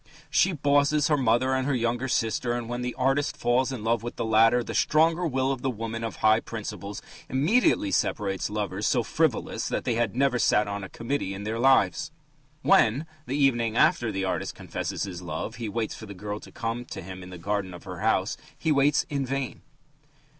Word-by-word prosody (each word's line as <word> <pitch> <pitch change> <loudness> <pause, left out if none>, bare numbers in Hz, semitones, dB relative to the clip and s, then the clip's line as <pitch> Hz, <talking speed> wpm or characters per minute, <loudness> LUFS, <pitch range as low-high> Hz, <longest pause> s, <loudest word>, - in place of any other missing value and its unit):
She 165 +5 +4
"bosses" 145 -1 +2
her 150 - +4
mother 130 0 +2
and 130 0 0
her 140 - +1
younger 120 +2 0
sister, 120 0 0
and 120 -1 -3
when 120 +1 -3
the 125 0 -3
artist 135 +2 +1
falls 125 +2 +1
in 125 -5 -5
love 115 0 +1
with 120 +1 -6
the - - -2
latter, 115 +2 +4
the - - -6
stronger 165 +3 +3
will 130 -2 0
of 130 -2 -3
the 135 - 0
woman 115 -1 -4
of 115 - -4
high 110 +1 +4
principles 105 -3 -6 0.3
immediately 250 - +2
separates 100 - 0
lovers 105 -1 -2
so 120 - +2
frivolous 155 0 0
that - - -2
they 120 - 0
had 115 -2 0
never 130 -1 +2
sat 105 -2 +3
on 100 0 -4
a 95 - -7
committee 115 -5 -3
in 100 - -7
their 110 +2 -3
lives. 135 +5 +3 0.5
When, 125 +8 +4 0.2
the 135 - -1
evening 120 -5 +2
after 120 -2 +3
the 95 0 -2
artist 90 -1 -2
confesses - - -4
his 90 -3 -5
love, 90 +5 -5
he 115 -3 -4
waits 110 +1 -2
for 110 - -9
the 100 - -9
girl 105 +2 -5
to - - -13
come 115 +1 -3
to - - -7
him 95 +1 -8
in 90 - -10
the 90 - -8
garden 100 +1 -2
of 90 -1 -10
her - - -7
house, - - +1 0.2
he 160 - 0
waits 145 +3 +3
in 140 -4 -2
vain. 135 0 -3
120 Hz, 210 wpm, -26 LUFS, 105-135 Hz, 0.5 s, She